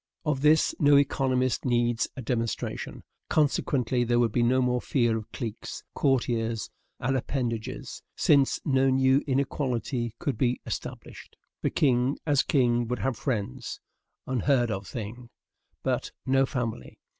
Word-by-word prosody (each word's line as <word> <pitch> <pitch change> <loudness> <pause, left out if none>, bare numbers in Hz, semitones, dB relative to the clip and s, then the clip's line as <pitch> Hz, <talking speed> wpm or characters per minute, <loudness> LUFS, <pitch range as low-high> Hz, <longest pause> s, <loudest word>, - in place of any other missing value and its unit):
Of 150 -3 0
this 150 +1 +4
no 145 -1 +6
economist 130 -2 +1
needs 120 -2 +1
a 130 - -5
demonstration. 115 -1 -3 0.3
Consequently, 130 -4 +1
there 120 0 +1
would 120 -2 +3
be 120 - +1
no 125 +2 +3
more 125 -1 +1
fear 120 -4 +1
of 110 0 -6
cliques, 115 -5 -6
courtiers, 115 -4 0 0.3
and 135 +2 0
appanages, 120 -4 -3
since 140 -2 +3
no 135 -1 +3
new 130 +1 +4
inequality 130 -3 -1
could 135 -7 -3
be 125 -1 +1
established. - - -7 0.3
The - - +1
king, 130 -1 +2
as 145 -3 +3
king, 120 -4 +2
would 125 +1 -1
have 135 -2 -1
friends 120 +1 -3 0.5
(unheard 130 -1 +1
of 95 -1 -4
thing), 120 +3 -7 0.5
but - - -1
no 135 0 +3
family. 115 - -4
125 Hz, 135 wpm, -27 LUFS, 120-135 Hz, 0.5 s, no